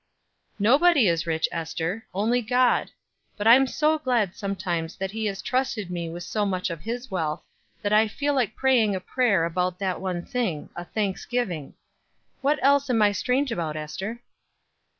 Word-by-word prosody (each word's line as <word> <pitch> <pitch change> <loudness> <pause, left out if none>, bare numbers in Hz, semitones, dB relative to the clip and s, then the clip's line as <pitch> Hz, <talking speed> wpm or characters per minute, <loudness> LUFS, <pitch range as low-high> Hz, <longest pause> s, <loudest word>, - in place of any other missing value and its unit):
"Nobody 270 - +5
is 170 -1 +1
rich, 160 -1 +1
Ester, 165 +5 -3
only 225 +6 +1
God; 245 +2 +2 0.5
but 205 - -3
I'm 255 +4 +7
so 310 +4 +1
glad 240 -10 0
sometimes 175 -5 -3
that 195 0 -4
he 220 0 -2
has 195 -1 -4
trusted 240 -7 -1
me 170 -2 -3
with 175 +1 -6
so 210 +3 -1
much 185 -3 -1
of 165 -2 -6
his 240 +3 -5
wealth, 160 -3 -2 0.4
that 205 0 0
I 215 +1 +5
feel 285 +7 -1
like 245 -6 0
praying 240 -6 +3
a - - -2
prayer 200 -4 +1
about 180 +2 -1
that 190 -2 -2
one 180 -2 -3
thing 215 -12 -2
a 175 - -6
thanksgiving. 195 - -3 0.7
What 285 +2 +2
else 280 0 +4
am 235 -3 +2
I 205 - +5
strange 250 +8 0
about, 160 -7 -2
Ester?" 190 +10 -5
205 Hz, 170 wpm, -25 LUFS, 175-245 Hz, 0.7 s, I'm